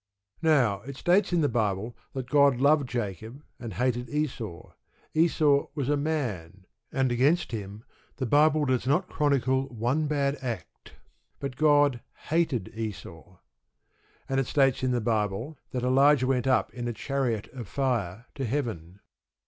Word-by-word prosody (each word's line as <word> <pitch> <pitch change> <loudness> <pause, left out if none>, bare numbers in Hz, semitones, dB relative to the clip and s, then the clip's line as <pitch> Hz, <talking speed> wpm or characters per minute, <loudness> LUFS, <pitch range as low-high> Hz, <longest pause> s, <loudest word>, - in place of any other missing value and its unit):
Now, 130 -11 +3
it 135 +4 -9
states 185 +5 +2
in 175 -2 +2
the 145 - +3
Bible 110 -2 -1 0.2
that 130 -2 -5
God 140 -2 +5
loved 140 0 +3
Jacob, 115 - -5 0.2
and 115 -6 -7
hated 125 -1 -1
Esau. 120 - -4 0.4
Esau 155 -3 +3
was 140 -3 -2
a 145 - +3
man, 115 - -3 0.3
and 130 -1 +1
against 140 +8 +2
him 105 -1 -6 0.3
the 130 - -3
Bible 150 +4 +4
does 130 -1 0
not 175 +7 +2
chronicle 135 -2 +1
one 130 +5 -1
bad 140 -1 0
act. 120 -4 -7 0.5
But 140 -2 -5
God 145 -4 +3 0.3
hated 155 - 0
Esau. 95 -5 -7 0.9
And 135 0 0
it 135 - -1
states 135 -3 +2
in 130 - +1
the 125 -1 0
Bible 110 +5 -1
that 125 -1 -3
Elijah 135 +1 +4
went 130 -1 0
up 130 - +2
in 120 -1 -4
a 120 - -2
chariot 120 -2 -2
of 120 -6 -7
fire 115 -6 -2
to 135 - -5
heaven. 105 - -3
130 Hz, 150 wpm, -27 LUFS, 115-145 Hz, 0.9 s, God